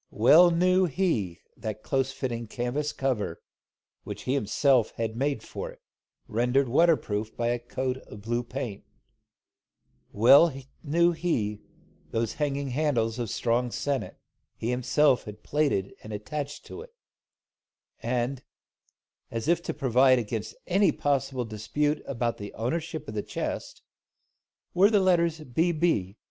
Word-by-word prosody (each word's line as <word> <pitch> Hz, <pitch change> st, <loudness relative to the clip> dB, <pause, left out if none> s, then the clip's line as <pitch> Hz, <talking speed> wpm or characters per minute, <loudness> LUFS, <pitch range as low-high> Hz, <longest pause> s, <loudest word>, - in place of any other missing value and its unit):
Well 155 Hz, +11 st, +6 dB
knew 185 Hz, +2 st, +3 dB
he 130 Hz, -, -1 dB
that 110 Hz, -2 st, -6 dB
close 135 Hz, 0 st, 0 dB
fitting 120 Hz, -4 st, -4 dB
canvas 125 Hz, +6 st, -2 dB
cover, 120 Hz, -, -2 dB, 0.6 s
which -, -, -7 dB
he 130 Hz, -, 0 dB
had 140 Hz, -, +2 dB
himself 120 Hz, +3 st, +2 dB
made 115 Hz, +3 st, -1 dB
for -, -, -6 dB
it, -, -, -14 dB, 0.5 s
rendered 125 Hz, +4 st, +1 dB
waterproof 120 Hz, -7 st, +1 dB
by 120 Hz, 0 st, 0 dB
a 120 Hz, 0 st, 0 dB
coat 125 Hz, +2 st, -3 dB
of 100 Hz, -1 st, -11 dB
blue 120 Hz, +2 st, 0 dB
paint, 120 Hz, -4 st, -6 dB, 1.3 s
well 140 Hz, +10 st, +7 dB, 0.3 s
knew 170 Hz, +3 st, +3 dB
he 120 Hz, -12 st, -1 dB, 0.5 s
those 115 Hz, -1 st, -1 dB
hanging 140 Hz, -1 st, -1 dB
handles 125 Hz, -5 st, 0 dB
of 120 Hz, -3 st, -2 dB
strong 120 Hz, +3 st, 0 dB
sennit, 140 Hz, +2 st, -2 dB, 0.4 s
he 115 Hz, -, -3 dB
had 125 Hz, -, 0 dB
himself 135 Hz, 0 st, +2 dB, 0.2 s
plaited 140 Hz, -10 st, 0 dB
and 110 Hz, -, -10 dB
attached 140 Hz, +8 st, -5 dB
to 410 Hz, -, -8 dB
it; 470 Hz, 0 st, -14 dB, 1.1 s
and, 125 Hz, +2 st, -1 dB, 0.9 s
as 115 Hz, +3 st, -4 dB
if 170 Hz, 0 st, +3 dB
to -, -, -3 dB
provide 130 Hz, -2 st, +4 dB
against 110 Hz, -2 st, -4 dB
any 195 Hz, +2 st, +3 dB
possible 135 Hz, -3 st, -1 dB
dispute 145 Hz, +8 st, -1 dB
about 120 Hz, -3 st, -1 dB
the 100 Hz, 0 st, -8 dB
ownership 160 Hz, +8 st, -3 dB
of 110 Hz, -, -6 dB
the 105 Hz, -, -1 dB
chest, -, -, -5 dB, 0.9 s
were 190 Hz, +3 st, +6 dB
the 210 Hz, -2 st, +4 dB
letters 170 Hz, -4 st, +2 dB
"B.B. 155 Hz, -, 0 dB
130 Hz, 135 wpm, -27 LUFS, 115-150 Hz, 1.3 s, well